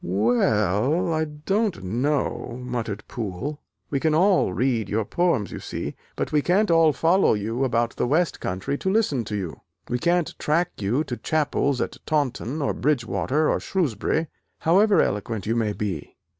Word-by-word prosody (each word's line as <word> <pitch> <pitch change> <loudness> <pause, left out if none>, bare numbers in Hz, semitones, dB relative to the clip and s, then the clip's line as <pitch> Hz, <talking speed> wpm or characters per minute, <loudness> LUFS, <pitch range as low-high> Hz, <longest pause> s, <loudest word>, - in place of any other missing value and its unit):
"We 110 +7 +2
ell, 110 - +2
I 160 0 +1
don't 170 - -1
know," 125 +4 -1
muttered 120 -5 -4
Poole, 120 +7 -4 0.3
"We 140 - +1
can 155 +1 +2
all 185 - +4
read 115 +1 0
your 110 0 0
poems, 170 - 0
you - - -6
see, - - -5 0.2
but - - -2
we 150 - +3
can't 185 +5 +2
all 165 -1 +5
follow 165 - +3
you 115 +5 -2
about 120 -2 0
the - - +1
west 160 +5 +1
country 95 +10 -3
to 190 - -1
listen 195 - +1
to 105 - -4
you, 95 -5 -5 0.3
we 125 - 0
can't 175 +1 +1
track 170 +4 +1
you 110 +9 +1
to 120 -5 -5
chapels 145 -3 0
at - - -3
Taunton, 145 -1 -1
or - - 0
Bridgewater, 135 - 0
or - - +1
Shrewsbury, 160 - 0 0.4
however 195 +6 +4
eloquent 105 0 -2
you 115 - 0
may 110 -3 +1
be. 95 -8 -4
135 Hz, 170 wpm, -24 LUFS, 110-160 Hz, 0.4 s, all